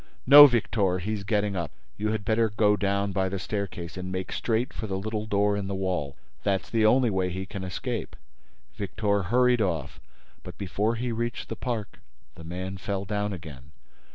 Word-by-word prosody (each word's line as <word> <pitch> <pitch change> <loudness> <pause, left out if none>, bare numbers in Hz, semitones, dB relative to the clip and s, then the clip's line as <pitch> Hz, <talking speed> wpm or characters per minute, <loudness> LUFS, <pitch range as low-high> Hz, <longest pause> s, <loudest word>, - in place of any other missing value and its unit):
"No, 145 +2 +11
Victor, 105 -6 +1
he's 105 +3 -3
getting 105 -1 0
up.... 85 -2 -2 0.3
You 105 +1 -2
had 110 -2 -3
better 110 +1 +2
go 105 0 +3
down 100 0 0
by 95 -1 0
the 100 - -3
staircase 90 -4 -4
and 90 0 -5
make 95 0 -4
straight 120 +2 -1
for 110 - -5
the 95 -1 -2
little 110 +2 -3
door 105 0 +2
in 100 -1 -3
the 100 - -3
wall. 90 -7 -2 0.2
That's 100 -2 -1
the 110 -2 +4
only 125 0 +4
way 95 -1 0
he 95 +2 -4
can 95 0 -7
escape." 90 -1 -4 0.6
Victor 100 +1 -1
hurried 125 +5 +3
off, 85 -9 -2 0.4
but, - - -10
before 100 +4 -1
he 120 +1 -2
reached 120 +1 -3
the 115 - -3
park, 115 -2 -4 0.3
the 80 - -12
man 90 +3 -5
fell 100 0 -3
down 105 0 -2
again. 75 -6 -9
100 Hz, 185 wpm, -27 LUFS, 95-110 Hz, 0.6 s, No